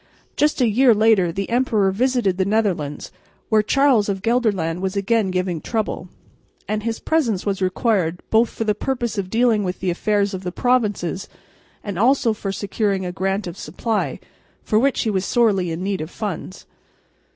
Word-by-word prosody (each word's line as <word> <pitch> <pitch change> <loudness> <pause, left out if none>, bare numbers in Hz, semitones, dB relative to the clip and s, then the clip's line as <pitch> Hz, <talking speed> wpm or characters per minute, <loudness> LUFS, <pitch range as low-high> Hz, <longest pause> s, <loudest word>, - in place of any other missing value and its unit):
Just 300 +1 +1
a 245 - +4
year 235 +2 +4
later 210 -5 +3
the 195 +3 -3
emperor 225 -6 +2
visited 240 -3 +1
the - - +4
Netherlands, 185 -8 -1 0.4
where 220 -1 +4
Charles 250 -2 +3
of 195 -1 -3
Gelderland 205 -8 0
was 190 +1 -2
again 205 0 +1
giving 180 -3 -2
trouble, 220 -2 -3 0.6
and 215 0 -1
his 225 +1 -3
presence 245 - 0
was 195 -2 -1
required 185 -3 0
both 225 +1 +4
for - - -4
the 215 -1 +1
purpose 240 -1 -2
of 185 -2 -3
dealing 225 -1 +2
with 180 -1 -3
the 185 -1 0
affairs 205 +2 0
of 185 - -4
the 180 -1 -4
provinces 210 -6 0 0.5
and 200 -3 -4
also 240 0 +3
for 200 -2 -4
securing 200 -1 -1
a 180 - -3
grant 195 +2 -2
of 175 -2 -7
supply, 210 +7 -2 0.4
for 225 +6 +3
he 220 - 0
was 190 -2 0
sorely 200 -5 +2
in 165 +2 -4
need 195 -2 -2
of 155 - -5
funds. 195 -2 -6
205 Hz, 175 wpm, -21 LUFS, 185-230 Hz, 0.6 s, a